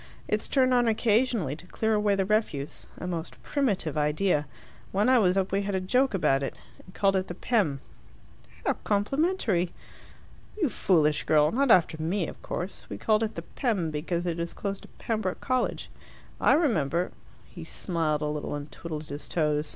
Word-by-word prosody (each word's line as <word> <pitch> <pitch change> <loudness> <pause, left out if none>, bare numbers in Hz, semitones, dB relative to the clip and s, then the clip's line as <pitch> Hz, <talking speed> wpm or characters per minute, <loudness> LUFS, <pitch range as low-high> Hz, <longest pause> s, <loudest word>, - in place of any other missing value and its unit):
It's - - -1
turned 255 -2 +3
on 245 -1 +4
occasionally 220 - +2
to 170 +3 -14
clear 220 +3 0
away 210 -1 +3
the 195 -1 +1
refuse 195 -9 -1
a - - -6
most 170 -2 -4
primitive 205 - 0
idea. 150 0 +1 0.4
When 205 +4 +2
I 255 -1 +6
was 185 -3 +3
up 190 0 +1
we 195 +1 +1
had 200 -1 -2
a - - +2
joke 250 +6 +2
about 135 -7 +2
it, 135 - -3 0.3
and 185 - -15
called 195 -1 +3
it 185 0 0
the 175 - -6
'Pem.'" 180 - +1 0.8
"How - - +3
complimentary!" 210 - +1 0.9
"You 325 -8 +2
foolish 155 -8 +2
girl, 150 0 +4
not 275 +2 +2
after 165 -6 +4
me, 170 +1 0
of - - -9
course. 180 +3 -5
We - - -5
called 215 0 +2
it 220 -1 -2
the 170 - -5
'Pem' 195 - -1
because 170 +3 -2
it 170 -1 -2
is 170 0 -3
close 200 -1 -4
to - - -14
Pembroke 215 -5 -2
College. 255 -2 -1 0.5
I - - +5
remember 175 - +1 0.2
" - - -27
He 170 - -7
smiled 160 -2 -1
a - - 0
little, 150 0 -3
and 145 0 -7
twiddled 155 -2 -6
his 145 0 -7
toes. 150 -2 0
185 Hz, 185 wpm, -28 LUFS, 155-220 Hz, 0.9 s, I